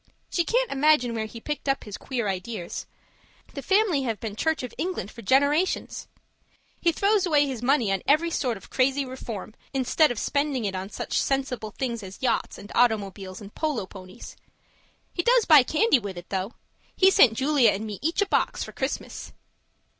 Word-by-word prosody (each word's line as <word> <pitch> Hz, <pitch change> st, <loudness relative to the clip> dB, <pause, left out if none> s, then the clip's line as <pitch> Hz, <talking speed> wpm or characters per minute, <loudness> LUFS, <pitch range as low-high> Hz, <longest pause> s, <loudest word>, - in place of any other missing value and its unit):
She 345 Hz, -, +2 dB
can't -, -, 0 dB
imagine 275 Hz, -4 st, +3 dB
where 220 Hz, -1 st, -2 dB
he 230 Hz, -, -10 dB
picked 295 Hz, +3 st, -4 dB
up 270 Hz, -, 0 dB
his 205 Hz, -2 st, -7 dB
queer 240 Hz, -5 st, -3 dB
ideas; 190 Hz, -1 st, -4 dB, 0.7 s
the -, -, -5 dB
family 390 Hz, -7 st, +2 dB
have 230 Hz, -5 st, -2 dB
been 215 Hz, -3 st, -5 dB
Church 320 Hz, +4 st, 0 dB
of 250 Hz, -, -6 dB
England 350 Hz, -, -3 dB
for 230 Hz, -, -11 dB
generations. 285 Hz, -, +1 dB, 0.7 s
He 340 Hz, -, +4 dB
throws 400 Hz, +2 st, +2 dB
away 295 Hz, -3 st, +4 dB
his 260 Hz, -5 st, -4 dB
money 245 Hz, -5 st, +2 dB
on 195 Hz, -1 st, 0 dB
every 315 Hz, +4 st, +3 dB
sort 250 Hz, -8 st, -1 dB
of -, -, -16 dB
crazy 270 Hz, +2 st, +1 dB
reform, 235 Hz, -5 st, -7 dB, 0.2 s
instead 270 Hz, +4 st, +3 dB
of 245 Hz, -, -3 dB
spending 280 Hz, -1 st, -1 dB
it 195 Hz, -, -2 dB
on 190 Hz, +1 st, -5 dB
such -, -, -2 dB
sensible 265 Hz, -5 st, -1 dB
things 235 Hz, +1 st, -4 dB
as 190 Hz, -1 st, -9 dB
yachts 255 Hz, -, -1 dB
and 205 Hz, -, -11 dB
automobiles 200 Hz, -5 st, 0 dB
and 205 Hz, 0 st, -11 dB
polo 295 Hz, -11 st, -2 dB
ponies. 185 Hz, +2 st, -11 dB, 0.8 s
He 345 Hz, -, 0 dB
does 480 Hz, +3 st, +4 dB
buy 305 Hz, -4 st, +8 dB
candy 310 Hz, -, +3 dB
with 200 Hz, -4 st, -7 dB
it 175 Hz, -, -10 dB
though! 195 Hz, +3 st, -3 dB, 0.4 s
He 380 Hz, 0 st, +5 dB
sent 235 Hz, -11 st, +6 dB
Julia 270 Hz, -2 st, +4 dB
and 205 Hz, +2 st, -2 dB
me 210 Hz, -2 st, -6 dB
each 330 Hz, +6 st, +1 dB
a -, -, -3 dB
box -, -, 0 dB
for -, -, -8 dB
Christmas. -, -, -5 dB
255 Hz, 185 wpm, -25 LUFS, 210-305 Hz, 0.8 s, buy